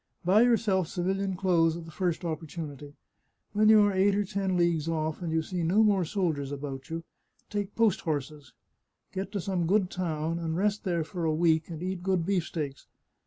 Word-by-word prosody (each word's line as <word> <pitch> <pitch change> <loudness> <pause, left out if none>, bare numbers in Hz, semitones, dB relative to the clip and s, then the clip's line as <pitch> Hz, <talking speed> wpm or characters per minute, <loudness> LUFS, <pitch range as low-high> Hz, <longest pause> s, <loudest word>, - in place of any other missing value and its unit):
Buy 195 +5 +5
yourself 220 -7 +3
civilian 190 +2 -1
clothes 170 -3 +2
at 170 - -8
the 165 - -10
first 175 +1 -2
opportunity. 150 -3 -6 0.6
When 215 +1 +4
you 215 -1 +8
are 205 -1 +2
eight 195 +1 +3
or 205 0 +1
ten 195 -2 -1
leagues 170 -3 +1
oflf, 160 0 -2
and 170 -2 -3
you 160 0 +1
see 180 +1 -3
no 185 +7 +4
more 200 -4 +3
soldiers 155 -7 -1
about 135 -2 -6
you, 165 0 -4 0.5
take 205 -1 -3
post 225 -5 +3
horses, 150 -2 -4 0.6
get 190 +1 -4
to 200 - -1
some 180 -2 -1
good 190 0 +2
town, 165 -2 -2
and 165 -1 -2
rest 205 +2 0
there 170 -3 0
for 170 +2 -5
a 155 -1 +1
week, 160 -1 +2
and 165 0 -6
eat 185 -1 -3
good 185 -2 0
beefsteaks. 165 -7 -2
175 Hz, 190 wpm, -28 LUFS, 160-195 Hz, 0.6 s, you